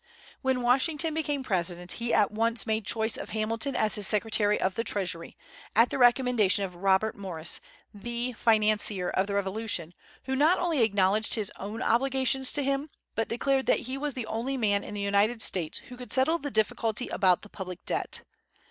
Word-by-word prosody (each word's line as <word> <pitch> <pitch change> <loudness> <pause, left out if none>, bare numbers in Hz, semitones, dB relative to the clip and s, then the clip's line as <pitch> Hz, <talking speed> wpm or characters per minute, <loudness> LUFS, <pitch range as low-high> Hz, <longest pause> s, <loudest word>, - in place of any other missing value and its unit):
When 260 -2 0
Washington 300 +6 +2
became 295 -3 -1
President, 180 -4 -2
he 235 0 -1
at 210 - +3
once 230 +2 +1
made 220 -2 -1
choice 220 -1 0
of - - -7
Hamilton 225 +5 0
as 215 -4 +1
his 205 -2 +2
Secretary 210 -1 +2
of 185 - 0
the 230 - -2
Treasury, 180 -7 -3 0.4
at 230 +3 +5
the - - -2
recommendation 245 -5 +3
of 185 - -8
Robert 195 +4 +1
Morris, 180 -6 -3 0.3
the 235 +4 -4
financier 215 -4 +2
of 190 +1 0
the 200 - -3
Revolution, 200 -4 -2 0.3
who 265 0 -2
not 310 +7 +4
only 335 -6 0
acknowledged 205 0 +3
his 215 -4 -3
own 210 +5 -5
obligations 265 +1 +1
to 290 - +1
him, 275 +2 -1 0.2
but 225 - -2
declared 265 +3 0
that - - +3
he 255 +2 -5
was 285 0 -3
the 250 -3 -3
only 235 +5 -3
man 205 -4 +1
in 210 - -7
the 205 - -3
United 200 +4 +2
States 180 -7 -1
who 250 - -9
could 250 0 -9
settle 300 +6 +3
the 285 - -4
difficulty 220 +1 0
about 185 -2 +2
the - - -10
public 185 -3 -8
debt. - - -3
225 Hz, 185 wpm, -28 LUFS, 200-255 Hz, 0.4 s, at